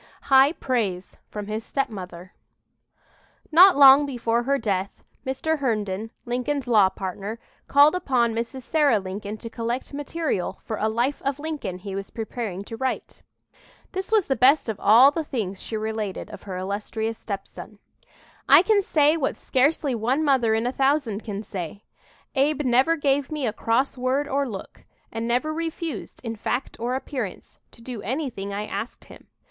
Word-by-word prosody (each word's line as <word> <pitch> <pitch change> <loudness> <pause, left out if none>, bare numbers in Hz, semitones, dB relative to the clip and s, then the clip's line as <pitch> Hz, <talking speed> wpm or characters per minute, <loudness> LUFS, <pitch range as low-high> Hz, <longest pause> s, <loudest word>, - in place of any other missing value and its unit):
HIGH 270 +3 +7
PRAISE 210 - -2
FROM 210 -1 -6
HIS 215 +2 -4
STEPMOTHER 190 -10 -5 1.2
Not 360 +1 +8
long 280 +1 +8
before 235 -3 0
her 275 +3 +1
death, 195 -6 -2 0.2
Mr. 305 +4 -1
Herndon, 215 -5 -1 0.2
Lincoln's 250 +3 -2
law 210 -5 +5
partner, 195 +3 -5 0.3
called 285 +2 +6
upon 255 -10 +1
Mrs. 235 +3 -4
Sarah 295 -5 +3
Lincoln 200 +2 -5
to 230 - -8
collect 235 +4 -4
material 290 - -3
for 220 - -4
a 220 - 0
"Life 240 +6 -1
of 275 0 -1
Lincoln" 290 - -4
he 195 +1 -7
was 195 0 -5
preparing 220 -4 -5
to 225 - -8
write. 260 +3 -4 0.7
This 380 +2 -5
was 430 -5 +4
the 270 - 0
best 270 +3 +4
of 220 -3 -3
all 240 +7 +7
the 320 +2 -2
things 210 -10 -4
she 220 - -4
related 215 -2 -4
of - - -9
her 185 - -4
illustrious 210 +4 -3
stepson: 200 -3 -7 0.7
"I - - +8
can 415 0 +3
say 305 -4 +3
what 280 - -1
scarcely 280 +1 +1
one 245 +7 0
mother 255 -6 +3
in 225 +1 0
a 245 - +1
thousand 270 -6 0
can 205 -1 -5
say, 190 -1 -6 0.5
Abe 290 +2 +2
never 260 +6 +3
gave 280 -2 +1
me 300 -3 -2
a 215 - -1
cross 250 +4 0
word 265 +3 0
or 275 -1 0
look, 195 -4 -9 0.3
and 225 +1 -3
never 250 +6 0
refused, 330 0 -5
in 230 -2 -4
fact 245 +4 -3
or 245 +2 -1
appearance, 255 -7 -5
to 230 - -18
do 240 -3 -6
anything 240 -5 -3
I 205 +1 -3
asked 225 - -6
him. - - -15
245 Hz, 165 wpm, -24 LUFS, 215-280 Hz, 1.2 s, Not